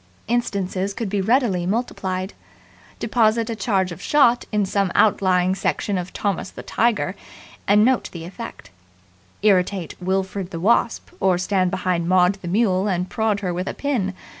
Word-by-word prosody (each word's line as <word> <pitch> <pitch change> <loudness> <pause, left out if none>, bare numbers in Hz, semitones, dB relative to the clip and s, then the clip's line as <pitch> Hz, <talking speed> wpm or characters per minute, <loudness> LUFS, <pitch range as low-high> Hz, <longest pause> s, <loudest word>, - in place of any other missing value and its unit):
Instances 200 -4 -1
could 225 -4 -3
be 200 0 0
readily 210 -5 +1
multiplied. 190 -3 -2 0.6
Deposit 230 0 +1
a - - -3
charge 190 -3 0
of 170 - -8
shot 245 -5 +3
in 210 -2 +1
some 195 -1 0
outlying 185 -3 +3
section 195 +1 -1
of 180 -1 -3
Thomas 195 -2 -2
the - - -10
Tiger, 220 -4 0 0.5
and 210 +2 +5
note 255 0 +1
the 165 -2 -7
effect. 185 - -9 0.7
Irritate 190 -4 +2
Wilfred 190 0 -2
the 170 - -6
Wasp, 225 +5 +1
or 190 -2 +3
stand 185 0 +1
behind 180 -2 -1
Maud 180 0 +4
the 175 - -7
Mule 195 0 +2
and 180 -2 -1
prod 220 -2 0
her 180 -3 -2
with 180 +2 -3
a - - -3
pin. 225 -10 -1
195 Hz, 160 wpm, -22 LUFS, 185-220 Hz, 0.7 s, and